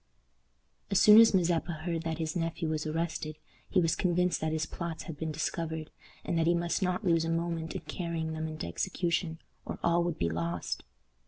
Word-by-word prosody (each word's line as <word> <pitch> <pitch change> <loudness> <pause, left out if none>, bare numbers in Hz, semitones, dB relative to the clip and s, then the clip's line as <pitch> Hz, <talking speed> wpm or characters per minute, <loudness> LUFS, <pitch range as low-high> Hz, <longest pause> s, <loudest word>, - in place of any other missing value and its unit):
As 195 - +3
soon 210 +2 +10
as 230 - +7
Mazeppa 170 -2 +1
heard 170 -2 -1
that 165 -1 -3
his 160 0 -3
nephew 165 -1 -1
was 155 0 -1
arrested, 155 -1 -2 0.3
he 190 - +3
was 165 -2 +2
convinced 180 -2 +1
that 160 0 0
his 155 0 0
plots 170 0 -5
had 165 - -7
been 160 +1 -3
discovered, 160 0 -3 0.3
and 165 - 0
that 165 - +2
he 170 - +4
must 170 +2 0
not 185 +3 0
lose 165 -2 +3
a 165 - -2
moment 165 -1 -2
in - - -3
carrying 160 +1 -3
them 160 0 -3
into 155 0 -5
execution, 170 - -1 0.3
or - - -5
all 170 0 +3
would 170 -2 -2
be 85 - +1
lost. 85 +1 -2
165 Hz, 195 wpm, -30 LUFS, 155-175 Hz, 0.3 s, soon